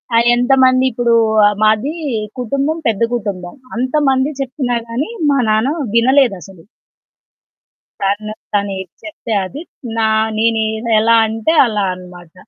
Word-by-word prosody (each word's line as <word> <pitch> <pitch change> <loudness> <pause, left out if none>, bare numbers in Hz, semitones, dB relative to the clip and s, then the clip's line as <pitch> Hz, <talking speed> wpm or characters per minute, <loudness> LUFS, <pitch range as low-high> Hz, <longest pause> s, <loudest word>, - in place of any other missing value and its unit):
ఆ! - - +5 0.2
ఎంతమంది 255 +1 +3
ఇప్పుడూ 240 0 0 0.5
మాది 220 +8 +2 0.5
కుటుంబం, 275 +6 -1
పెద్ద 220 -2 -1
కుటుంబం. 195 -6 -4 0.2
అంతమంది 265 +1 +1
చెప్పినా 255 -2 -2
గాని, 240 - -3 0.2
మా 280 - +2
నాన్న 220 +7 +1 0.2
వినలేదసలు. 230 - +1 1.4
తను 205 +2 -2 0.2
తనేది 195 -2 -2
చెప్తే 310 -7 -6
అది. 270 +11 -8 0.4
నా 220 -1 +2 0.3
నేను 225 0 +1 0.4
ఎలా 230 +1 +4
అంటే, 225 +8 -1
అలా 210 -3 -1
అనమాట. 180 -2 -13
230 Hz, 110 wpm, -16 LUFS, 205-260 Hz, 1.4 s, ఆ